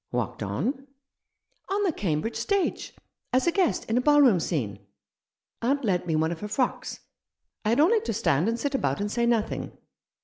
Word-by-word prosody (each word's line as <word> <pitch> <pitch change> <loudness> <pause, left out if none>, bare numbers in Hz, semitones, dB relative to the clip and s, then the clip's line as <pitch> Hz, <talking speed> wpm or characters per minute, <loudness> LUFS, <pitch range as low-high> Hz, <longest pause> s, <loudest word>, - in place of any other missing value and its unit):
"Walked 120 -2 -3
on?" 230 - -2 0.4
" - - -34
On 405 +1 +1
the 380 - +2
Cambridge 190 - -2
stage— 400 -2 -1 0.4
as 255 0 +2
a 340 - +3
guest 370 -2 +1
in 225 - +1
a - - +3
ballroom 280 -8 +5
scene. 115 - -2 0.8
Aunt 275 +3 +1
lent 180 -3 0
me 160 - +1
one 160 +1 +1
of 170 - -5
her 210 - -5
frocks. 245 +4 -2 0.6
I 215 - 0
had 235 +5 +2
only 420 +9 +4
to 230 - -3
stand 175 -3 +1
and 230 +1 -2
sit 285 +3 -2
about 140 - 0
and 205 0 -2
say 235 +1 +1
nothing. 230 -2 -1
230 Hz, 190 wpm, -26 LUFS, 170-280 Hz, 0.8 s, ballroom